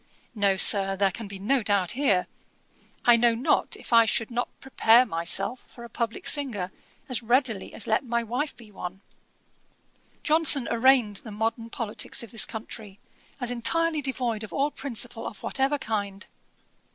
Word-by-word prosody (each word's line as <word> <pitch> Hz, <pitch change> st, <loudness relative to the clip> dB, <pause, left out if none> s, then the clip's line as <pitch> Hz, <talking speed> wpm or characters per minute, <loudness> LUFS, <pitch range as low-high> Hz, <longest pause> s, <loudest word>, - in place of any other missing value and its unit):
No, 200 Hz, -3 st, +1 dB
Sir, 195 Hz, 0 st, +6 dB
there 195 Hz, 0 st, +2 dB
can 220 Hz, +3 st, -8 dB
be 200 Hz, 0 st, -8 dB
no 245 Hz, +7 st, +1 dB
doubt 200 Hz, -4 st, 0 dB
here. 235 Hz, -9 st, +1 dB, 0.8 s
I 240 Hz, -, +7 dB
know 235 Hz, 0 st, +3 dB
not 255 Hz, +7 st, 0 dB
if -, -, -7 dB
I 230 Hz, 0 st, +7 dB
should 225 Hz, +2 st, 0 dB
not 240 Hz, +1 st, -2 dB
prepare 250 Hz, -2 st, +4 dB
myself 195 Hz, +5 st, -1 dB
for 235 Hz, -, -13 dB
a 235 Hz, -, -10 dB
publick 230 Hz, 0 st, -4 dB
singer, 230 Hz, -11 st, 0 dB, 0.4 s
as 255 Hz, -4 st, -2 dB
readily 240 Hz, -3 st, 0 dB
as -, -, -3 dB
let 220 Hz, -, +1 dB
my 235 Hz, -2 st, -1 dB
wife 250 Hz, +7 st, -3 dB
be 225 Hz, -3 st, -15 dB
one.' 190 Hz, -1 st, -8 dB, 1.2 s
Johnson 305 Hz, -4 st, +3 dB
arraigned 235 Hz, -3 st, +3 dB
the 220 Hz, -, -8 dB
modern 225 Hz, +2 st, -3 dB
politicks 230 Hz, -1 st, -1 dB
of 230 Hz, -, -11 dB
this 230 Hz, -, 0 dB
country, 215 Hz, -2 st, -9 dB, 0.4 s
as 245 Hz, -2 st, -1 dB
entirely 310 Hz, +7 st, +1 dB
devoid 250 Hz, -5 st, -2 dB
of 215 Hz, -, -8 dB
all 285 Hz, +2 st, 0 dB
principle 240 Hz, -4 st, -4 dB
of 210 Hz, -, -10 dB
whatever 275 Hz, +2 st, 0 dB
kind. 205 Hz, -5 st, -4 dB
230 Hz, 165 wpm, -26 LUFS, 205-255 Hz, 1.2 s, I